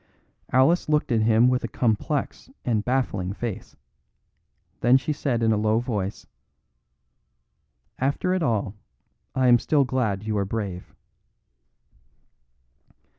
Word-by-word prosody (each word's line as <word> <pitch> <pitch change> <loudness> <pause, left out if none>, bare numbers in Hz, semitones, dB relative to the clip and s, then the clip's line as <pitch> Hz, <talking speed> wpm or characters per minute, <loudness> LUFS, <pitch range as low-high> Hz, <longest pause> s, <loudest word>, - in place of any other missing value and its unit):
Alice 145 +7 +3
looked 150 -3 +1
at 115 -2 +2
him 110 +2 +4
with 125 0 +1
a - - -1
complex 130 - -2 0.2
and 110 -4 0
baffling 105 -8 -1
face; 115 -1 -6 1.0
then 120 +3 +5
she 150 +3 -2
said 130 -5 -1
in 110 - +3
a 110 - +2
low 110 +1 +2
voice: 105 -5 -3 1.7
"After 140 +7 0
it 185 - 0
all, 110 - 0 0.6
I 130 -1 +2
am 120 -1 +6
still 145 +2 +2
glad 115 -7 -1
you 110 0 -2
are - - +1
brave." 100 -3 -5
120 Hz, 125 wpm, -24 LUFS, 110-130 Hz, 1.7 s, am